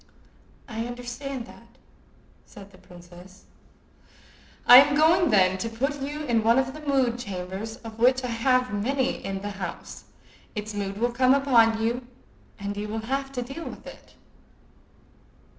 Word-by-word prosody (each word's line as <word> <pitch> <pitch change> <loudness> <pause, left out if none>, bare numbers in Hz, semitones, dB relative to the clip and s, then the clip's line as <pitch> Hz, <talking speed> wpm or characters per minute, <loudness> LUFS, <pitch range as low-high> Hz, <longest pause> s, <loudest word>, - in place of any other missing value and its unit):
"I 230 -1 -4
understand 245 +1 -6
that," 235 -1 -17 0.7
said 200 -1 -13
the 185 - -18
princess. 180 +2 -15 1.2
"I 245 - +11
am 285 +2 +6
going, 330 +3 +4
then, 190 -3 +3
to 230 - -3
put 275 +5 -3
you 295 +2 -4
in 240 -5 +1
one 230 +2 +4
of 265 0 0
the 305 - -10
mood 265 -5 0
chambers 195 +1 -6
of 225 0 -9
which 255 +2 +3
I 250 - -3
have 250 +1 +1
many 260 +6 -1
in 195 0 -5
the 205 - -4
house. 190 -4 -8 0.5
Its 210 0 -5
mood 200 -1 -4
will 240 +2 0
come 255 +2 +4
upon 230 -5 +3
you, 240 +2 -2 0.5
and 200 0 -5
you 205 +1 -4
will 220 +1 -5
have 275 0 -2
to 250 -2 -3
deal 275 +7 -8
with - - -9
it." - - -13
235 Hz, 160 wpm, -25 LUFS, 205-265 Hz, 1.2 s, I